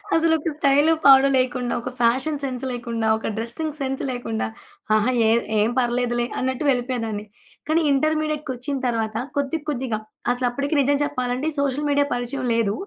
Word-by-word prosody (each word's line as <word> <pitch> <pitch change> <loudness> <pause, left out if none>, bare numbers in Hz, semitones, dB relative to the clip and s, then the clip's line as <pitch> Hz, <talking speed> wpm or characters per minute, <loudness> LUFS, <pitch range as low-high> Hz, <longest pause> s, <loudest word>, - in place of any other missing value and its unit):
అసలొక 320 -1 +2
style, 290 +2 +4
పాడు 270 0 +8
లేకుండా, 255 -1 0
ఒక 255 - -4
ఫ్యాషన్ 260 +6 +1
సెన్స్ 255 -1 -3
లేకుండా, 235 -2 -2
ఒక - - -5
డ్రెసింగ్ 280 +7 -4
సెన్స్ 270 -1 -2
లేకుండా 225 -3 -3 0.5
ఆహా! 215 +4 +2 0.2
ఎద్ 230 +1 +2
ఏం 215 +2 +3
పర్లేదులే! 240 0 0
అన్నట్టు 260 +3 -1
వెళ్ళిపోయేదాన్ని. 240 -5 -1 0.4
కానీ, 325 +2 +3
ఇంటర్మీడియేట్టుకొచ్చిన 300 -2 -1
తరువాత 225 -2 -1 0.2
కొద్ది 285 +3 0
కొద్దిగా 250 -5 -2 0.3
అసలప్పటికి 255 +4 -1
నిజం 285 +1 +2
చెప్పాలంటే 255 +1 -2
సోషల్ 280 +1 0
మీడియా 285 0 +3
పరిచయం 250 +2 -3
లేదు. 215 -3 +1
255 Hz, 140 wpm, -23 LUFS, 240-285 Hz, 0.5 s, పాడు